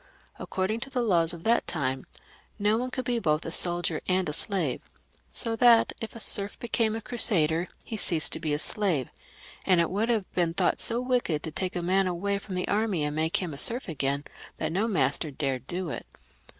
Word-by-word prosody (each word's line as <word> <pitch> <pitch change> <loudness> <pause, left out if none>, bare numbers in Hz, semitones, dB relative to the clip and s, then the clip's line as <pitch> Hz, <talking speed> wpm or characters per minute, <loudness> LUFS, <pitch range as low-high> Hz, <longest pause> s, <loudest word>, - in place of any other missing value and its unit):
According 190 +4 -2
to 265 - -6
the 250 -2 -1
laws 170 -7 +3
of 170 -1 -9
that 230 +1 +2
time, 130 -5 -2 0.5
no 210 +1 +2
one 250 +3 -2
could 255 -1 -4
be 240 -1 +1
both 155 -5 0
a 165 - -4
soldier 175 -2 0
and 185 0 +1
a 150 - -2
slave; 165 - +2 0.5
so 230 -2 -2
that 235 -1 +5
if 225 - -5
a - - -7
serf 200 -2 -1
became 225 -2 0
a 225 - -4
Crusader 175 -8 +3 0.2
he 220 - -5
left 165 -6 +2
off - - -6
being 150 -2 0
a - - -1
slave, 165 - +1 0.5
and 185 -2 +4
it 170 - +1
would 215 +5 0
have 220 -5 -1
been 170 -2 0
thought - - +1
so 235 +1 -1
wicked 245 - 0
to 160 - -4
take 185 +3 -3
a 175 - -2
man 190 +2 +2
away 200 +3 -1
&om 185 - -3
the 180 - -2
army 205 -6 0
and 150 0 -2
make 160 +1 +1
him 170 -4 -4
a 140 - -5
serf 240 - +3
again, 140 -3 -1 0.3
that 155 0 -2
no 200 +6 0
master 150 - 0
dared 135 -3 -3
do 180 -1 -2
it. - - -6
185 Hz, 215 wpm, -27 LUFS, 160-220 Hz, 0.5 s, that